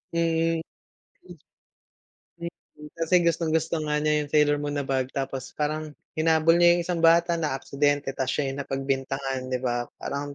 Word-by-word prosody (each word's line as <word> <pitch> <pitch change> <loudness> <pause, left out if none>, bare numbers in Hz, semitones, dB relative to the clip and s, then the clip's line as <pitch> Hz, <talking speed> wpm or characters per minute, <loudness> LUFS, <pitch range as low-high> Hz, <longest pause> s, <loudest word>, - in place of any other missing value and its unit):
Mm. 165 0 +1 1.8
Mm. 170 0 -4 0.5
Kasi 165 +2 0
gustong-gusto 165 -1 +1
nga 150 0 0
niya 150 0 +2
yung 145 - -12
Sailor 150 -1 +3
Moon 145 0 -3
na 145 - -1
bag, 130 -1 0
tapos 135 -1 -4
parang 155 +1 -2 0.3
hinabol 160 +1 +4
niya 175 0 +6
yung - - 0
isang 170 0 -2
bata, 170 +1 +5
na-aksidente, 145 -1 0
tas 130 - -2
siya 140 0 -1
yung 135 - -6
napagbintangan, 135 -1 -2
'di 130 - 0
ba? 120 -1 -1
Parang 140 0 -4
150 Hz, 150 wpm, -26 LUFS, 135-165 Hz, 1.8 s, niya